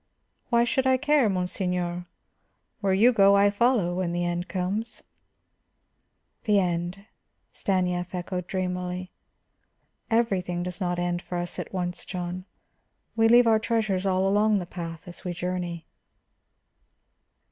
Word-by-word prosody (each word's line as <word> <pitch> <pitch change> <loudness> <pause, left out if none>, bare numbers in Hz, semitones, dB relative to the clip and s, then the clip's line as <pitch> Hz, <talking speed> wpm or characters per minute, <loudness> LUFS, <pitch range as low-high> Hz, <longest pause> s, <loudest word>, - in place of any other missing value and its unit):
"Why 235 -1 +4
should 265 +2 +1
I 260 0 +4
care, 290 -4 +3
monseigneur? 180 -1 -2 0.7
Where 200 -2 0
you 235 +6 +5
go, 200 -2 +6
I 200 0 +5
follow, 210 -4 +2
when 175 -1 -1
the 175 0 -1
end 175 +1 -2
comes." 195 +5 -3 1.4
"The 210 -2 +4
end," 175 +2 -2 0.5
Stanief 180 -2 -1
echoed 180 0 -4
dreamily. 180 -1 -3 1.0
"Everything 190 -7 0
does 180 +2 -6
not 175 -1 0
end 175 0 -1
for 180 - -5
us 175 0 -3
at - - -5
once, 180 -2 -3
John; 180 0 -5 0.7
we 225 0 +4
leave 240 +1 +7
our 220 -1 +4
treasures 215 -4 0
all 190 0 +2
along 210 +2 +3
the 180 - -3
path 165 -1 -7
as 175 - -10
we 180 - -3
journey." 175 -1 -4
185 Hz, 135 wpm, -26 LUFS, 175-210 Hz, 1.4 s, leave